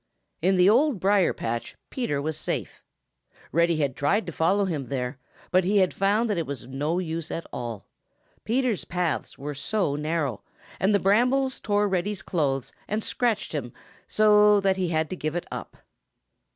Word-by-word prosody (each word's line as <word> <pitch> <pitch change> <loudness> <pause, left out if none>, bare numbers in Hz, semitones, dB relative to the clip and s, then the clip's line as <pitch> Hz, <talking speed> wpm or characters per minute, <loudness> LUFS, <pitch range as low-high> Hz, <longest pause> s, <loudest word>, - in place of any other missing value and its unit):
In 190 +3 +3
the 180 0 +5
Old 250 +2 +4
Briar 195 0 +3
patch 115 +1 -4 0.2
Peter 235 - -1
was 155 +2 -2
safe. - - -4 0.7
Reddy 170 +1 +3
had 140 -4 0
tried 200 +10 +1
to 170 - -5
follow 190 +6 +2
him 150 -8 -3
there, 130 0 -3 0.3
but 185 +1 +4
he 200 +4 +2
had 185 -2 +3
found 205 +4 +2
that 205 -5 0
it 165 - -3
was 140 -2 -5
of 130 - -13
no 150 +6 -1
use 165 -2 -3
at 165 - -4
all. 115 -4 -5 0.6
Peter's 240 -2 0
paths 175 -2 -2
were 145 +2 -5
so 145 +2 -1
narrow, 150 -5 -2 0.4
and 200 +2 +3
the - - +4
brambles 250 +7 +2
tore 205 0 +1
Reddy's 195 +1 -1
clothes 135 -6 -1
and 215 +1 -2
scratched 235 -5 0
him 120 -6 -4 0.3
so, 210 -1 +5
that 195 -1 +2
he 185 -1 0
had 160 -1 +1
to - - -2
give 155 -2 -3
it 175 - -2
up. - - -7
180 Hz, 180 wpm, -26 LUFS, 150-205 Hz, 0.7 s, the